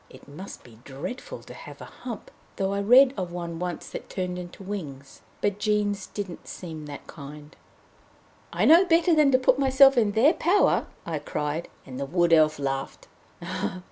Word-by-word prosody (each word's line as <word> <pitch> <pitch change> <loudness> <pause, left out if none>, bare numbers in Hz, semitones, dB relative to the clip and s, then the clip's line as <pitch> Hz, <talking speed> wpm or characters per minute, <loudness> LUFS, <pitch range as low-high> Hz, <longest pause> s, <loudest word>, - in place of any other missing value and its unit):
It - - -16
must 155 +8 -10
be 115 -3 -17
dreadful 140 - -7
to - - -11
have - - -11
a - - -9
hump, 235 -5 -9 0.2
though 195 0 -1
I 200 - -1
read 255 +6 +6
of 180 -2 -3
one 170 -1 -5
once 180 -2 -4
that - - -8
turned 180 -1 -3
into 180 +2 -10
wings. 145 -9 -7 0.2
But 205 0 0
Jean's 205 -2 0
didn't 195 -4 -7
seem 160 -4 -8
that 145 -1 -9
kind. 150 +1 -11 1.0
"I - - 0
know 335 +4 +8
better 345 -1 +3
than 300 -3 +4
to 255 - +5
put 255 0 +2
myself 270 -1 +6
in 210 -3 +1
their 270 - +5
power," 370 +5 +2 0.2
I 160 -3 -3
cried, 150 +2 -3 0.2
and 130 -1 -8
the 140 - -3
Wood 175 +2 +2
Elf 155 -1 +5
laughed. 135 -1 -4
185 Hz, 175 wpm, -26 LUFS, 150-245 Hz, 1.0 s, know